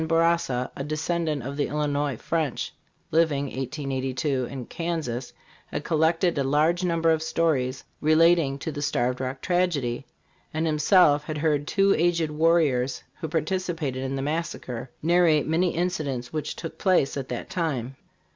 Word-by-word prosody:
Bourassa, 165 -6 +1
a 135 - -4
descendant 155 -1 -1
of 140 +3 -5
the 145 - +1
Illinois, 145 -3 -1
French, 155 -3 -2 0.4
living 160 -3 +2
(1882) 135 0 -2
in 130 -1 -6
Kansas, 155 -8 -3 0.4
had - - -4
collected 165 +1 +2
a - - +2
large 155 +6 +2
number 165 -2 +2
of 160 -1 +1
stories 145 -6 0 0.2
relating 155 -2 +4
to 160 - -4
the 145 - -5
Starved 125 -3 0
Rock 130 +1 -4
tragedy; 150 -9 0 0.5
and 160 +1 0
himself 150 -1 +4
had 155 0 -4
heard 150 -1 +1
two 195 -1 +3
aged 170 -2 +1
warriors, 150 -5 +2 0.2
who 160 - -3
participated 160 -4 -2
in 135 0 -2
the 135 - -2
massacre, 135 -5 -3
narrate 170 -2 +4
many 170 +3 +1
incidents 155 -8 -2
which 155 -1 -3
took 165 - -7
place 185 -8 +2
at 135 -2 -4
that 120 - -5
time. 135 -8 -2
150 Hz, 145 wpm, -26 LUFS, 135-165 Hz, 0.5 s, relating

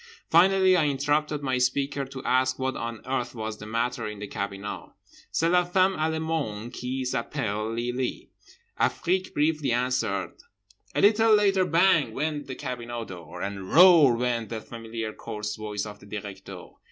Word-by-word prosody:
Finally 185 +2 +5
I 160 -4 +3
interrupted 145 +1 0
my 130 -2 0
speaker 135 +2 0
to 135 0 -9
ask 130 0 +2
what 130 0 -2
on 115 -1 -5
earth 125 -2 -2
was 110 -1 -5
the 105 - -8
matter 115 +1 -1
in 105 0 -6
the 105 - -6
cabinot?—"C'est 100 +10 -5
la 180 +1 +4
femme 185 +2 +2
allemande 160 - -2
qui 130 +1 -3
s'appelle 110 -3 -2
Lily," 120 +2 -3 0.5
Afrique 185 +2 0
briefly 150 -2 +1
answered. 120 -6 0 0.6
A - - +2
little 220 +1 +5
later 195 -3 +3
BANG 165 -8 +3
went 150 +2 -2
the 130 - -5
cabinot 120 -3 -5
door, 90 -1 -8
and 95 -1 -5
ROAR 165 -7 +8
went 120 -3 -1
the 115 - -4
familiar 115 -1 -6
coarse 105 -2 -5
voice 105 -1 -4
of 105 -1 -9
the - - -15
Directeur. 100 -2 -8
125 Hz, 155 wpm, -26 LUFS, 110-155 Hz, 0.6 s, ROAR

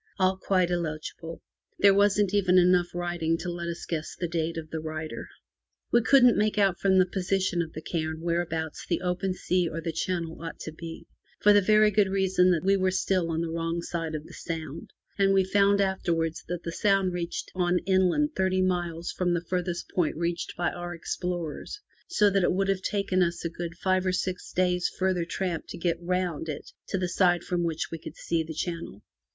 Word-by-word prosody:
All 190 0 +3
quite 185 -2 +1
illegible. 165 -1 -4 0.3
There 200 -1 +6
wasn't 200 0 +3
even 185 -3 +4
enough 180 -1 +4
writing 175 -2 -1
left 165 - -1
to 180 - -3
let 170 0 -5
us 170 0 -5
guess 155 -2 -4
the 175 - -3
date 165 -1 -2
of 155 -1 -6
the 160 - -3
writer. 155 0 -5 0.6
We 240 - +5
couldn't 250 0 +6
make 210 0 +1
out 195 -3 +3
from 190 -1 +3
the 185 - +6
position 185 -1 0
of 160 -1 -5
the 155 - -7
cairn 160 -2 -3
where 170 0 +1
abouts 160 -2 -4
the 170 - 0
open 185 +1 -1
sea 180 -2 0
or 165 - -4
the 165 0 -3
channel 165 0 -3
ought 165 -1 -6
to 160 - -5
be, 165 +1 -9 0.3
for 210 - +6
the 205 - +6
very 215 +2 +5
good 200 -1 +3
reason 190 -1 +3
that 170 -4 +2
we 195 +1 +4
were 190 -1 +2
still 185 -2 0
on 165 0 -1
the 165 -1 -3
wrong 165 +1 -2
side 165 -3 -3
of 155 0 -5
the - - -13
Sound, 160 -2 -6 0.3
and 195 0 +4
we 190 - +5
found 200 +1 +3
afterwards 170 -4 0
that 175 0 -4
the 165 - -4
Sound 195 0 +2
reached 170 -1 -4
on 180 -1 +1
inland 190 +10 +3
thirty 185 0 +2
miles 175 -2 -1
from 175 -1 0
the 170 0 -3
farthest 180 -1 -2
point 170 -4 +1
reached 170 +1 -2
by 175 0 0
our 175 0 -6
explorers, 175 - -4 0.3
so 210 - +3
that 195 0 +2
it - - +3
would 195 +1 0
have 195 -1 +1
taken 200 -2 0
us 170 -1 0
a - - 0
good 170 0 -6
five 185 0 +1
or - - +3
six 185 0 -3
days 180 -1 +1
farther 185 -2 +1
tramp 175 -1 -3
to - - -7
get 170 0 -1
round 175 -3 -1
it 150 - -6 0.2
to 195 - -1
the 185 -1 -1
side 175 -1 +2
from 175 -1 -1
which 165 -2 -2
we 165 - -5
could - - -9
see 165 -1 -1
the 160 0 -6
channel. 165 - -5
175 Hz, 215 wpm, -27 LUFS, 165-190 Hz, 0.6 s, There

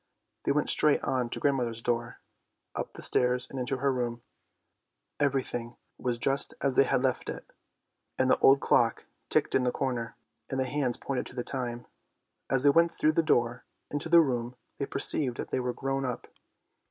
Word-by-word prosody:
They - - +2
went 150 +1 +1
straight 150 - +5
on 130 -2 0
to - - -4
grandmother's 125 -5 0
door, 120 0 -2 0.6
up - - -5
the - - -5
stairs, 125 0 +2
and 135 - -7
into 125 +1 -2
her 135 +1 +1
room. 120 -2 -3 1.0
Every 140 -2 +2
thing 120 0 -6 0.2
was 125 -2 -1
just 135 +3 +1
as 135 -2 0
they 135 - +5
had 125 - +1
left 130 -1 0
it, - - -6 0.7
and 130 - +2
the - - +3
old 135 +1 +6
clock - - +2 0.2
ticked - - +2
in - - +3
the 125 - +1
corner, 125 -4 -3 0.3
and 135 - -2
the 130 - +1
hands 130 -2 -1
pointed 135 -2 -3
to - - -12
the 120 - -2
time. 120 -3 -4 0.6
As 130 -1 +1
they 145 - +6
went 165 +3 +4
through 155 -2 +1
the 165 - +3
door 120 -6 +1 0.3
into 145 +3 -3
the 170 0 +8
room 125 -4 -2 0.2
they 140 - -2
perceived 135 -2 0
that - - -6
they - - 0
were 125 0 -1
grown 135 +2 -2
up. 125 -2 -4
130 Hz, 190 wpm, -29 LUFS, 120-140 Hz, 1.0 s, the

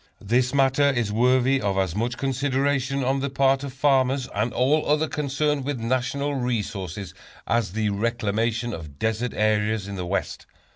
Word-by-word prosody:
This 125 +5 +1
matter 140 +1 +3
is 120 -6 0
worthy 125 +4 +3
of 100 -2 -1
as 95 -3 0
much 120 +3 -1
consideration 140 0 0
on 135 +2 +1
the 140 +1 -2
part 135 0 +2
of 140 - -5
farmers, 135 -1 +2
and 105 +4 0
all 140 +6 +2
others 150 +1 +2
concerned 145 0 -1
with 140 -2 -3
national 130 +4 -1
resources, 105 -7 -3 0.3
as 115 -6 0
the 110 -1 0
reclamation 115 +2 -1
of 75 -4 -8
desert 110 +5 -1
areas 105 -1 +1
in 100 -1 -6
the 90 -1 -4
West. 95 +2 -3
125 Hz, 160 wpm, -24 LUFS, 105-135 Hz, 0.3 s, matter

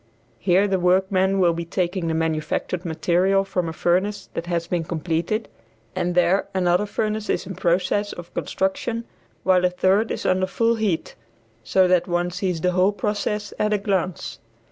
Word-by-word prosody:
Here 190 +2 +3
the 190 -1 +1
workmen 190 +1 +2
will 175 -2 +4
be 170 +1 -3
taking 175 0 -2
the 160 - 0
manufactured 160 +2 -2
material 175 +4 +2
from 180 -3 -2
a - - -4
furnace 185 +5 0
that 170 - -4
has 170 -1 -1
been 175 -1 -1
completed, 170 +6 -2 0.5
and 175 0 -1
there 180 +2 +3
another 180 +2 +2
furnace 215 +1 -2
is - - 0
in 190 - -6
process 185 +3 0
of 175 -1 -10
construction, 225 +5 -2 0.4
while 185 -1 +4
a 180 - +4
third 190 +4 +2
is - - -4
under 185 0 +2
full 230 +4 +1
heat, 215 -7 -1 0.5
so 185 +7 +3
that 180 -1 +3
one 175 0 0
sees 180 -2 -2
the 180 - +2
whole 185 +3 +3
process 210 -1 -2
at 210 0 +2
a - - +3
glance. 190 -4 -2
185 Hz, 170 wpm, -23 LUFS, 175-200 Hz, 0.5 s, will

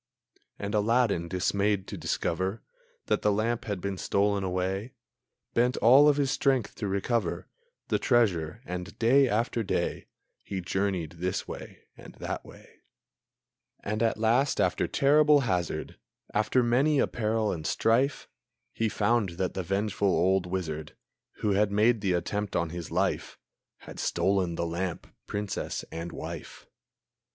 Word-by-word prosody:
And 100 0 -4
Aladdin, 110 -4 +2
dismayed 100 +2 0
to - - -5
discover 95 +5 -2 0.4
That - - +1
the 105 - +3
lamp 110 +3 0
had 100 -3 -3
been 95 0 -4
stolen 100 0 +1
away, 95 +5 -2 0.6
Bent 125 +2 +2
all 135 +6 +7
of 145 - +3
his 140 -2 +1
strength 135 -5 +1
to 105 - -3
recover 100 +4 -1 0.4
The - - +1
treasure, 105 - +1
and 90 +3 -6
day 130 +3 +4
after 115 +2 0
day, 105 - -2 0.4
He 95 - -4
journeyed 90 -3 -2
this 90 +1 -2
way - - -9
and - - -13
that - - -5
way; - - -16 1.0
And 105 +2 -2
at 115 -2 +2
last, 120 +6 +2
after 90 0 +1
terrible 150 +1 +4
hazard, 90 -9 -2 0.3
After 110 +4 +2
many 135 +6 +3
a - - +4
peril 110 -1 -1
and 80 -3 -4
strife, 125 +5 +1 0.5
He 115 -1 0
found 105 -3 +1
that 95 -1 -1
the 95 - -2
vengeful 100 +2 -1
old 95 0 +2
wizard, 80 -4 -4 0.5
Who 105 - +1
had 100 +1 +2
made 110 +2 +3
the 95 -3 +1
attempt 100 +4 -2
on 85 -1 0
his 85 -2 -6
life, - - -1 0.4
Had - - -10
stolen 95 -3 +1
lamp, 85 +1 -3 0.2
princess 105 -1 -3
and 85 +1 -5
wife. 80 0 -8
100 Hz, 145 wpm, -28 LUFS, 90-115 Hz, 1.0 s, all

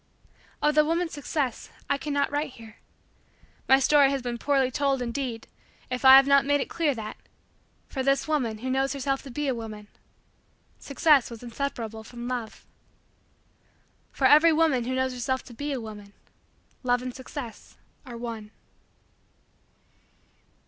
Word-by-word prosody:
Of 300 - +3
the 305 0 +5
woman's 330 +2 -1
success, 285 -4 -3 0.2
I 280 - 0
cannot 285 0 -1
write 290 -2 -2
here. 225 -2 -14 0.9
My 265 - +8
story 280 +1 +5
has 275 -2 -2
been 240 -1 -4
poorly 270 -2 +1
told, 275 0 0
indeed, 240 -1 -4 0.4
if 250 +1 -3
I 265 0 +10
have 270 0 +8
not 280 0 +5
made 285 +1 +2
it - - -4
clear 310 -5 0
that, 215 -2 -7 0.7
for 265 - -4
this 275 +2 +1
woman 255 -8 0
who 255 +4 -4
knew 265 - +1
herself 270 0 -1
to 275 - -11
be 290 +4 -3
a 265 - +1
woman, 215 -3 -8 0.9
Success 280 -1 +3
was 235 0 -10
inseparable 230 -3 -5
from 240 +1 -8
Love. 245 -3 -5 1.5
For 270 - -1
every 305 +5 +7
woman 310 -6 +2
who 260 +1 -2
knows 260 0 0
herself 260 +1 -2
to 245 - -13
be 290 +5 -4
a 270 - -2
woman, 210 -3 -10 0.7
Love 245 -1 +1
and 255 -1 -5
Success 260 -2 -9 0.3
are 245 -4 -9
one. 230 -3 -6
260 Hz, 155 wpm, -26 LUFS, 235-285 Hz, 1.5 s, I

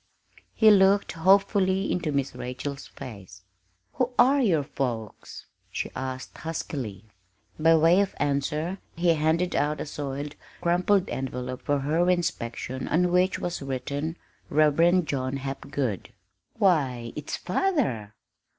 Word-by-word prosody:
He 220 -1 +7
looked 200 0 +4
hopefully 190 +2 +3
into 170 -4 -1
Miss 140 -1 -1
Rachel's 125 +3 -6
face. 100 -6 -11 0.5
"Who 250 - 0
are 275 +3 +5
your 170 - +2
folks?" 120 -6 -5 0.3
she - - -3
asked 130 0 -6
huskily. 130 - -5 0.5
By 165 +1 +5
way 165 +4 +5
of 200 - -2
answer 150 +5 -1 0.2
he 175 +1 +1
handed 160 +3 +1
out 150 +1 0
a - - -3
soiled, 145 0 -5 0.3
crumpled 180 +3 +2
envelope 125 -1 -4
for 145 -1 0
her 160 +6 +1
inspection 130 -7 -2
on 175 +2 +2
which 180 +2 +3
was 175 -3 -4
written, 140 +4 -3 0.3
"Reverend 160 +4 +4
John 130 -1 -2
Hapgood." 135 -4 -4 0.5
"Why 135 - +1
it's 150 -1 -4
father!" 180 - -1
150 Hz, 125 wpm, -26 LUFS, 130-180 Hz, 0.5 s, He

